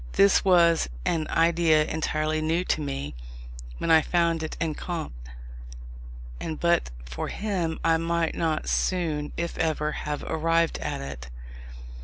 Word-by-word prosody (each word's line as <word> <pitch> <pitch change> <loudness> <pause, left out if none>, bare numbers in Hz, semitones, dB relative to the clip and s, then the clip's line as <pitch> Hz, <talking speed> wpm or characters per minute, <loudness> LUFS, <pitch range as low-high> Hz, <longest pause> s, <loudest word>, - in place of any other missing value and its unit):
This 200 0 +5
was 170 - +4 0.2
an 160 -2 0
idea 165 -2 +3
entirely 155 0 -1
new 165 +3 +1
to 160 - 0
me 140 -1 -4 0.6
when 165 - 0
I 160 -1 +7
found 170 0 +1
it 155 - -5
in 160 -2 -1
Comte: 165 - -5 1.3
and 160 -1 -4
but 170 0 +2 0.2
for - - -5
him 180 -6 -2
I 165 0 +4
might 165 0 0
not 160 -2 -1
soon 160 -5 0
(if 170 0 -3
ever) 155 -2 0
have 150 -1 -4
arrived 165 +1 +1
at - - -3
it. 70 -2 -7
160 Hz, 140 wpm, -26 LUFS, 155-170 Hz, 1.3 s, I